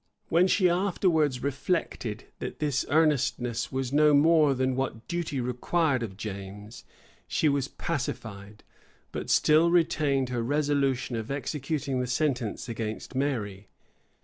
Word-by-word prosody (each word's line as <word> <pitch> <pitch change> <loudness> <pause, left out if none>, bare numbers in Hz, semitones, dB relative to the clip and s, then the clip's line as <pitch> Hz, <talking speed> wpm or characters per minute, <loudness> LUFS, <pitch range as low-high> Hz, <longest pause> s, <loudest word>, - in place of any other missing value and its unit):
When 175 +3 +4
she 185 -1 +3
afterwards 170 -7 +1
reflected, 140 - -2 0.2
that - - -5
this 145 -3 -1
earnestness 135 -6 +1
was 130 0 -3
no 150 0 +5
more 150 -1 +5
than 130 0 0
what 130 -3 -3
duty 170 -5 -2
required 130 +3 0
of 100 -5 -5
James, 105 +2 -8 0.4
she 155 - +1
was 140 -2 +1
pacified; 110 -9 -5 0.5
but - - -5
still 155 +2 +4
retained 150 -6 +2
her 120 -2 -1
resolution 140 -1 0
of 110 -1 -4
executing 140 -1 -2
the 125 - -1
sentence 125 -4 -1
against 110 0 -5
Mary. 110 -8 -2
135 Hz, 125 wpm, -27 LUFS, 120-155 Hz, 0.5 s, no